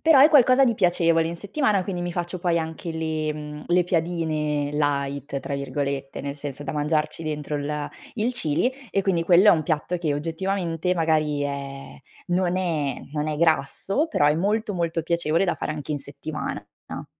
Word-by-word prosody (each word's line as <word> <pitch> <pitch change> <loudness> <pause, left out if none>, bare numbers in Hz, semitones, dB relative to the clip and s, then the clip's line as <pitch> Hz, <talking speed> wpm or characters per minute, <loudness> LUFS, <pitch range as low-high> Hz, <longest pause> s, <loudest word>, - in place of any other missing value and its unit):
però 320 -4 +6
è 295 - +9
qualcosa 270 -2 +6
di 235 -3 +2
piacevole 170 -3 +3
in 170 - -5
settimana, 205 - +1
quindi 180 -2 -3
mi 175 - -2
faccio 175 +1 -3
poi 170 -2 +2
anche 160 +1 -4
le 160 -1 -2
mhmm, 150 0 -8
le 180 0 +4
piadine 160 -4 -1
"light" 140 -1 -1
tra 140 - -4
virgolette, 140 -1 -3
nel 140 0 -4
senso 145 -1 -6
da - - -3
mangiarci 150 +2 0
dentro 150 -1 -3
il 145 0 -3
a 150 -1 -3 0.3
il 235 +2 0
chili 160 - +2 0.2
e 195 - +1
quindi 175 -4 +1
quello 180 +4 +6
è - - +11
un 160 - +3
piatto 160 +2 -1
che 160 -4 0
oggettivamente 170 +2 -1
magari 155 -3 +1
è 140 -1 -5 0.3
non 180 0 +1
è 160 -7 -1
non 150 0 -1
è 150 - -2
grasso, 170 - +1
però 145 - +2
è 150 - +4
molto 205 +5 0
molto 170 -2 -1
piacevole 170 +1 +1
da 175 - +1
fare - - -4
anche 150 0 -5
in 145 - -1
settimana 145 +2 -6 0.2
na - - -7
160 Hz, 190 wpm, -24 LUFS, 150-180 Hz, 0.3 s, è